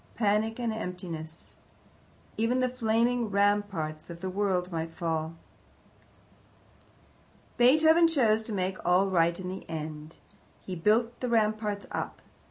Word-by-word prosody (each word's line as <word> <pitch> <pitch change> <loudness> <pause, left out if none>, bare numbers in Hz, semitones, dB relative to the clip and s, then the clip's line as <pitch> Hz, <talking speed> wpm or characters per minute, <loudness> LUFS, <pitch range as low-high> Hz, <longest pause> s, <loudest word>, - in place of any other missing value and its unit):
Panic 220 +1 +1
and 235 -2 -1
emptiness! 175 -5 -7 0.8
Even 230 +3 +1
the 255 0 +2
flaming 235 -1 +1
ramparts 200 -7 0
of 170 0 -8
the 185 +1 -4
world 185 -2 0
might 165 -1 -4
fall. 160 -1 -2 2.2
Beethoven 315 +7 +6
chose 230 -9 +3
to 220 - -7
make 185 -2 -2
all 185 +2 +3
right 170 -1 +2
in 185 - -5
the 190 +1 -6
end. 155 -1 -6 0.5
He 185 - -4
built 225 +7 +1
the 250 - -2
ramparts 215 -2 0
up. - - -4
200 Hz, 125 wpm, -28 LUFS, 170-225 Hz, 2.2 s, Beethoven